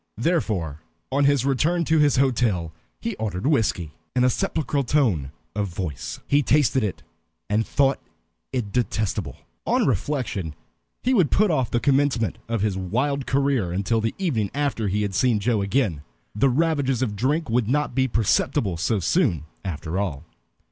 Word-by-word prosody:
Therefore, 105 - -1 0.3
on 140 +1 +2
his 140 -2 +3
return 160 +6 +1
to 160 +1 +3
his 150 -1 +4
hotel, 115 -11 +1 0.3
he 230 -3 -3
ordered 100 -3 -3
whiskey, 110 - +1 0.2
in 125 - +3
a 125 - +4
sepulchral 150 -5 -1
tone 115 - +1 0.2
of 105 -1 0
voice. 85 -6 -5
He 145 +1 +3
tasted 135 -3 +3
it, 105 - -3 0.5
and 110 +2 +1
thought 135 -1 +2 0.5
it 120 -6 -2
detestable. 110 -3 -1 0.3
On - - +3
reflection, 110 - -1 0.5
he 255 - +2
would 185 - +4
put 210 -2 +3
off 130 -6 +1
the 120 - +1
commencement 135 - +1
of 115 -3 -1
his 105 -2 0
wild 130 +9 -1
career 135 -9 +1
until 100 +5 0
the 115 - -2
evening 125 - 0
after 140 -7 0
he 105 +2 0
had 100 -2 -2
seen 120 +2 +2
Joe 105 0 +1
again. 100 - 0 0.3
The 125 +7 +3
ravages 135 -3 +1
of 105 -5 -2
drink 145 +9 0
would 120 -2 +2
not 145 +1 0
be 130 +1 +2
perceptible 105 -5 +1
so 95 +5 0
soon, 100 - +1 0.2
after 90 -1 -3
all. 85 -7 -3
120 Hz, 160 wpm, -24 LUFS, 100-140 Hz, 0.5 s, his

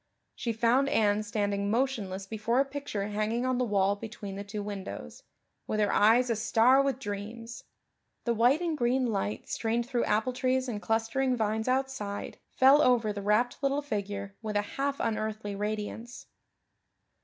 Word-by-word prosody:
She 235 - -3
found 240 +5 +2
Anne 210 -3 +2
standing 205 -2 -1
motionless 215 -6 -1
before 220 +4 0
a 275 - +4
picture 275 -8 -4
hanging 215 +4 -1
on 255 -1 0
the - - +2
wall 200 -3 +2
between 205 -2 -7
the 200 - -5
two 205 0 -5
windows, 190 - -7 0.5
with 215 - -1
her 205 -1 +2
eyes 235 +4 +4
a - - +2
star 235 +4 +4
with 275 -2 0
dreams. 230 0 -7 0.6
The 235 - +1
white 245 +8 +3
and 335 -3 -1
green 255 0 +1
light 110 - -2
strained 230 +1 -1
through 245 -2 0
apple 220 +4 +1
trees 260 0 0
and 215 -4 -4
clustering 230 +4 0
vines 220 +1 -1
outside 255 -6 -2
fell 270 +3 +6
over 235 -6 +3
the 205 - -5
rapt 215 +6 +1
little 275 +1 0
figure 200 -5 -4
with 215 -2 -4
a 205 - +2
half 280 0 -1
unearthly 215 -1 -2
radiance. 215 +4 -4
225 Hz, 165 wpm, -29 LUFS, 205-255 Hz, 0.6 s, fell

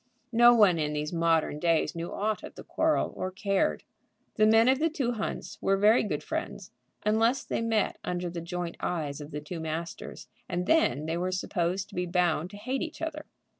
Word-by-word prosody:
No 240 +1 +7
one 195 -7 +5
in 150 -1 -1
these 150 +2 -3
modern 165 -3 +1
days 165 0 +2
knew 170 0 -5
aught 215 +1 -1
of - - -10
the - - -9
quarrel, 315 -1 0
or 185 - -3
cared. 195 +1 0 0.5
The 215 - +4
men 225 +2 +5
of 260 +1 +4
the 325 +2 +2
two 275 -6 -1
hunts 220 -3 -5
were 195 0 +2
very 210 +4 +5
good 210 - -3
friends, - - -5 0.3
unless 225 +5 +2
they - - -2
met 225 -3 0
under 180 0 -2
the 170 0 -5
joint 175 0 -4
eyes 150 -4 -3
of 145 - -8
the 150 -1 -5
two 165 +3 -6
masters, 160 +1 -5 0.2
and 175 +1 -1
then 255 - +2
they 165 +1 -2
were 180 +1 -1
supposed 185 0 -1
to - - -17
be 180 0 -1
bound 175 -2 +1
to 205 - -10
hate 260 +6 -3
each 330 -1 -5
other. 305 -2 -5
185 Hz, 205 wpm, -28 LUFS, 170-225 Hz, 0.5 s, No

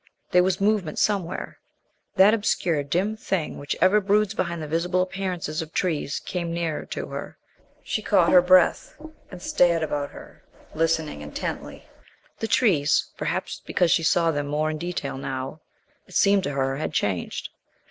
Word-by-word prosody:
There 180 - +6
was 185 +1 +1
movement 200 -6 +1
somewhere. 190 -4 -1 0.6
That 195 +3 +6
obscure 180 -8 +1
dim 180 +9 -1
thing 190 -6 -3
which 145 - -3
ever 195 +4 +4
broods 205 +1 +2
behind 170 -5 -2
the - - -5
visible 175 +4 +1
appearances 185 -5 -3
of 160 -1 -8
trees 155 -6 -1
came 170 -2 -3
nearer 170 -2 -3
to - - -4
her. - - -7 0.5
She - - -2
caught - - +3
her 180 - +8
breath 180 - +3 0.3
and 180 - -9
stared 170 -2 +3
about 145 -2 -2
her, - - -14 0.3
listening 160 - 0
intently. 75 0 -6 0.5
The 225 - -2
trees, 160 - +2
perhaps - - -3
because 175 -3 +1
she 175 - +4
saw 165 0 +3
them 145 -2 -2
more 155 +2 0
in 155 - -5
detail 175 -5 -4
now, 135 +3 -5 0.5
it - - -13
seemed 200 0 +4
to 145 - -2
her 135 0 -1
had 155 +1 -3
changed. 95 - -2
170 Hz, 160 wpm, -24 LUFS, 150-185 Hz, 0.6 s, her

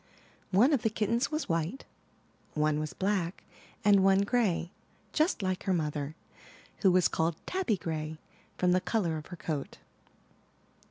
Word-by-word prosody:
One 230 +11 +5
of 270 - +2
the 225 - +2
kittens 225 +4 0
was 310 +1 -2
white, 165 +9 -2 0.7
one 150 0 +2
was 155 0 -3
black, 190 -3 -1 0.4
and 200 -2 +6
one 195 0 +5
gray, 200 -6 +1 0.4
just 310 - +1
like 185 0 -2
her 190 - +2
mother, 150 -2 -2 0.6
who 190 - +4
was 180 -1 +5
called 160 0 0
Tabby 370 - 0
Gray 155 -2 -4 0.4
from 180 -1 +2
the 180 +1 +3
color 180 -6 0
of 155 - -8
her 175 - -8
coat. 150 -4 -4
185 Hz, 150 wpm, -30 LUFS, 160-210 Hz, 0.7 s, and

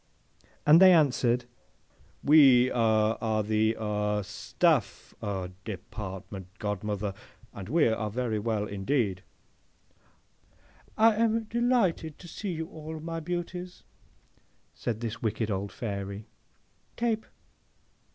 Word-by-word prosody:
And 155 +4 +7
they 190 -1 +9
answered, 125 -6 +3 0.8
'We 135 -4 +6
aw 110 -2 +2
are 110 -1 0
the 110 +1 +1
aw 105 -1 -1
Staff - - 0
aw 95 -3 -3
Department, 95 -1 -7
godmother, 105 0 -3 0.4
and 100 0 -8
we 160 -2 +4
are 110 -1 -1
very 115 -1 -2
well 105 -1 -1
indeed.'—'I 100 -2 -1 1.9
am 225 0 +2
delighted 220 - 0
to 175 - -12
see 200 +4 -5
you 160 -1 -3
all, 155 0 -8
my 165 +1 -4
beauties,' 175 +2 -5 0.9
says 115 -3 -3
this 115 -1 -5
wicked 110 -1 -1
old 100 0 -3
Fairy, 100 -2 -5 0.7
'—Tape! 230 -2 -1
115 Hz, 105 wpm, -28 LUFS, 105-160 Hz, 1.9 s, they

